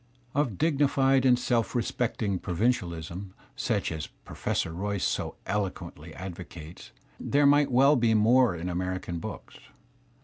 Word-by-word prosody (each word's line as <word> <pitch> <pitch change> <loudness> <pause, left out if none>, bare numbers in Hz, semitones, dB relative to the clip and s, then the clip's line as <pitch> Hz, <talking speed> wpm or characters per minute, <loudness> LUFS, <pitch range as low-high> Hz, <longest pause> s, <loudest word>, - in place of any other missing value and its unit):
Of 130 -9 0
dignified 135 -4 +3
and 125 -1 +5
self 120 -2 0
respecting 110 -4 -1
provincialism, 90 -2 -2 0.2
such - - -1
as 80 -2 -4 0.2
Pro - - -10
fessor 80 - -1
Royce 100 +2 -2
so - - -2
eloquently 90 -5 -4
advocates, 85 -3 -9 0.3
there 145 +1 +2
might 145 -1 +5
well 135 +4 +5
be 115 -3 +3
more 115 -1 +4
in 85 +2 -5
American 90 -1 -3
books. - - -8
105 Hz, 130 wpm, -28 LUFS, 90-125 Hz, 0.3 s, and